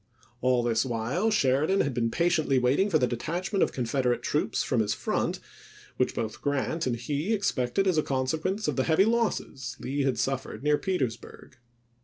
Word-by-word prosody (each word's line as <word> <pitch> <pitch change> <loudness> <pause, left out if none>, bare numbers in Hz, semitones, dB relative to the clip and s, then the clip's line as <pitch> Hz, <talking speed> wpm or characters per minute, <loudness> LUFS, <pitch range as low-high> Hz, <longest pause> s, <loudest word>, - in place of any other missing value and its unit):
All 125 -1 +2
this 115 -1 +2
while 125 - -1
Sheridan 155 0 +2
had 140 - -1
been 115 -1 0
patiently 165 -3 +1
waiting 130 +11 +2
for 165 - +4
the 130 - +2
detachment 175 - -2
of - - +3
Confeder 125 0 0
ate - - -14
troops 150 - 0
from 130 - 0
his 105 -2 +1
front, - - -1 0.6
which - - 0
both 110 -1 -4
Grant 145 +2 -1
and 120 - 0
he 145 - -2
expected 195 - 0
as 180 -5 +3
a - - +4
consequence 160 +10 -1
of - - -1
the 130 - +2
heavy 165 +4 +4
losses 215 - -1
Lee 140 +2 -2
had 135 -3 +1
suffered 135 +3 -3
near 150 0 +3
Petersburg. 130 - -4
135 Hz, 180 wpm, -27 LUFS, 125-175 Hz, 0.6 s, for